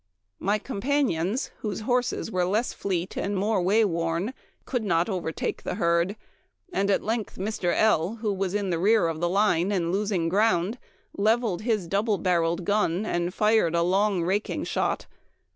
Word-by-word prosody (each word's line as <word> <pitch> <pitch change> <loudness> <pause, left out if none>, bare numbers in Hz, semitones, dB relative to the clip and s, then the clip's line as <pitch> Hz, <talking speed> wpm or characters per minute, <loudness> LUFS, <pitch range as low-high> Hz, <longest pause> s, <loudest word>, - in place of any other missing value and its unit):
My 205 +3 +1
companions, 240 - -1
whose 210 -2 -4
horses 245 0 -1
were 185 -2 +1
less 210 +7 0
fleet 185 -2 -3
and 200 0 -2
more 205 0 +1
way 210 +5 +3
worn, 170 +4 -1 0.3
could 250 -4 -2
not 170 -1 +1
overtake 175 -5 -3
the - - -4
herd; 170 0 +1 0.6
at 200 0 +1
length 220 -1 -2
Mr. 190 -2 -1
L., 210 -2 +2
who 215 -2 -2
was 195 0 -2
in 200 -3 -1
the 165 - 0
rear 210 0 +4
of 160 -1 -3
the 175 +1 0
line 195 -1 +2
and 175 -4 0
losing 195 -3 0
ground, 200 +3 +1 0.4
leveled 215 -2 +1
his 215 -5 0
double 205 +3 +1
barreled 170 -1 0
gun, 205 -1 +1
and 175 -3 -1
fired 210 -4 +2
a 170 - +3
long 190 0 +2
raking 195 +5 -1
shot. - - -1
195 Hz, 160 wpm, -26 LUFS, 175-215 Hz, 0.6 s, rear